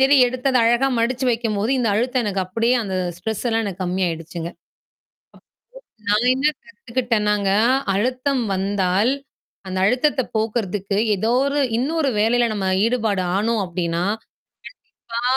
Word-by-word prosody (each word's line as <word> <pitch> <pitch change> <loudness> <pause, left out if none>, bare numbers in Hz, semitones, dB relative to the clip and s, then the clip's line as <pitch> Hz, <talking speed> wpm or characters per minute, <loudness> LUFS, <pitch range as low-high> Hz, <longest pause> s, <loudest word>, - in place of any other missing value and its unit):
தேடி 270 +2 +5
எடுத்து 255 +2 -2
அத 255 - +3
அழகா 240 +3 +3
மடிச்சு 250 +3 0
வைக்கும்போது 225 -1 -1
இந்த 235 - +1
அழுத்தம் 250 +3 +1
எனக்கு 195 -2 -1
அப்படியே 230 +6 +1
அந்த 195 -3 -4 0.2
ஸ்ட்ரெஸ் 220 +6 -4
எல்லாம் 225 0 +1
எனக்கு 195 -2 -4
கம்மாயிடுச்சுங்க. 170 -2 -3 1.6
நான் 215 +5 +3
என்ன 270 +3 +1 0.2
கத்துக்கிட்டேனாங்க 230 - -1 0.5
அழுத்தம் 255 +4 0
வந்தால். 195 +3 +1 0.6
அந்த 185 0 -4
அழுத்தத்த 260 +5 +2 0.2
போக்குறதுக்கு 205 -3 -1 0.2
ஏதோ 220 +5 0
ஒரு 285 +1 0 0.2
இன்னொரு 295 +2 0
வேலையில 240 +2 +3
நம்ம 195 -3 -2 0.2
ஈடுபாடு 220 -5 0
ஆணோம் 220 +1 +1
அப்டின்னா 170 -1 -2 1.1
கண்டிப்பா 235 - -2
225 Hz, 125 wpm, -21 LUFS, 195-250 Hz, 1.6 s, தேடி